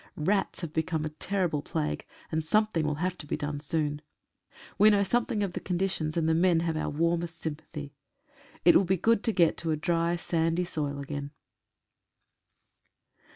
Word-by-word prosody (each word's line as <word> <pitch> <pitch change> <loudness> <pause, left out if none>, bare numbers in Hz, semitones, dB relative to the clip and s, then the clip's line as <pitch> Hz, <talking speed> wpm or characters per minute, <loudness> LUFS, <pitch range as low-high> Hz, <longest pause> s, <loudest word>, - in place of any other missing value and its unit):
Rats 195 +6 0
have 165 -3 -5
become 160 -1 -1
a - - -2
terrible 170 -1 -1
plague, 75 - -3 0.2
and 160 0 0
something 175 -2 +2
will 150 - 0
have 180 +4 -1
to 150 - -8
be - - -1
done 145 0 -3
soon. 150 0 -1 0.8
We 210 +2 +8
know 205 -1 +4
something 225 0 0
of 190 -3 -2
the - - -3
conditions, 175 -4 -1
and 160 -1 +2
the 160 - +3
men 170 0 +3
have 165 -1 -1
our 155 - -1
warmest 165 +2 0
sympathy. 150 -2 -6 0.7
It 175 - +8
will 195 - +6
be 190 +1 +1
good 230 +4 +2
to 225 - +3
get 170 -6 +3
to 165 - -3
a 155 - +1
dry, 170 +1 +1
sandy 165 0 0
soil 145 -4 -3
again. 140 0 -5
165 Hz, 175 wpm, -29 LUFS, 155-180 Hz, 0.8 s, We